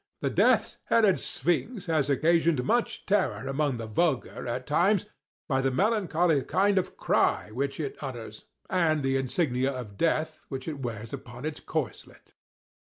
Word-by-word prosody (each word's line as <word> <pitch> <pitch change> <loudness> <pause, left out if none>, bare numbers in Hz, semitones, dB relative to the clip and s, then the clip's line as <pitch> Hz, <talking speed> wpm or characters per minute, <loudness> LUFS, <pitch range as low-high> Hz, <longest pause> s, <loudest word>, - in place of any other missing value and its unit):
The - - 0
Death's - - +3
headed 215 -5 +4
Sphinx 190 +5 -1
has 155 -4 +1
occasioned 160 -1 +3
much 235 - 0
terror 175 - +1
among 135 -1 0
the 115 - -5
vulgar, 130 +3 -1
at 125 +2 -3
times, 180 +7 +2 0.4
by 135 -4 +1
the 135 - +2
melancholy 175 - +2
kind 195 +6 +2
of 185 0 -5
cry - - +1
which 135 +5 -2
it 145 -3 -4
utters, 115 -6 -7 0.2
and 160 -5 +1
the 135 0 +1
insignia 135 -1 0
of 120 -7 -7
death 160 -1 0
which 135 0 -5
it 150 -3 -4
wears 115 -3 -5
upon 125 +3 -8
its 155 -1 -4
corslet. 140 - -5
145 Hz, 155 wpm, -28 LUFS, 125-175 Hz, 0.4 s, headed